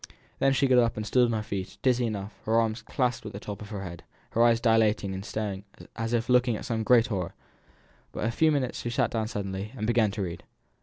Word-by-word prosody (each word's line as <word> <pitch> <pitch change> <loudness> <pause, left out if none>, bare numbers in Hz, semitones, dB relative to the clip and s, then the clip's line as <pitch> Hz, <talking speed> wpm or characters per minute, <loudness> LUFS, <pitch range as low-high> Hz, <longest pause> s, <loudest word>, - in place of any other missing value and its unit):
Then 135 - +4
she 135 +1 +2
got 130 -2 +5
up 115 -2 +2
and 110 - -3
stood 125 +4 +4
on 120 - 0
her 110 -1 -1
feet, 100 -3 -5
dizzy 125 -2 +3
enough, 105 -1 -4
her 110 - +1
arms 110 0 0
clasped 125 -1 -1
at 105 - -8
the 100 - -6
top 105 -1 -7
of 105 - -8
her 100 -3 -5
head, 85 -3 -7 0.3
her 115 - +1
eyes 115 -1 +5
dilated 110 -4 +2
and 95 0 -5
staring 100 -3 -4 0.3
as 115 0 -3
if 115 -1 0
looking 125 -2 +3
at - - -6
some 115 -4 -1
great 115 +1 +5
horror. 95 -7 -3 0.8
But - - -6
after 110 - +1
a - - -1
few 160 -1 +5
minutes 135 -4 -1
she 120 - -3
sat 120 - +1
down 110 -2 -1
suddenly, 100 -1 -4
and 110 - -2
began 115 -2 +3
to 100 0 -3
read. 85 -2 -5
110 Hz, 250 wpm, -28 LUFS, 105-120 Hz, 0.8 s, got